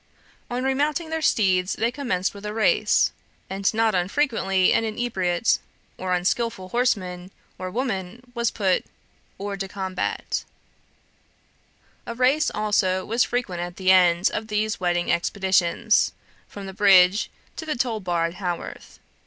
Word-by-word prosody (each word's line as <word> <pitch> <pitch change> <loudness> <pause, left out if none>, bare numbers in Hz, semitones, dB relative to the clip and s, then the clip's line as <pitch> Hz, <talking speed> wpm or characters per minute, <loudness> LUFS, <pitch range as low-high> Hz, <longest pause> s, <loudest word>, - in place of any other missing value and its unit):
On 245 +1 -2
remounting 295 +5 0
their 320 0 -1
steeds 190 -9 +2
they 230 +2 0
commenced 220 -10 -1
with 200 0 -11
a 210 0 -5
race, 220 - +3 0.4
and 195 0 +1
not 225 0 +2
unfrequently 190 -1 +1
an - - +2
inebriate 215 -4 0 0.4
or 185 -1 0
unskilful 190 +2 -1
horseman 185 -7 -1 0.3
or 185 - -4
woman 210 -2 -3
was 235 -1 0
put 190 -4 +1 0.6
hors 200 0 -4
de 195 - -3
combat. 190 -1 -3 1.6
A 235 - -4
race 265 +5 +3
also 190 -3 0
was 230 +3 +2
frequent 220 -8 -2
at 175 0 -5
the 190 -1 +3
end. 180 -1 +4
of 215 - -3
these 215 0 -1
wedding 175 -1 0
expeditions, 190 +4 +2 0.3
from 200 -1 -9
the 190 - -7
bridge 195 +1 +5 0.3
to - - -6
the 305 - -1
toll 235 -3 -1
bar 175 -3 0
at 170 - -3
Haworth. 180 -3 -6
200 Hz, 140 wpm, -24 LUFS, 185-235 Hz, 1.6 s, bridge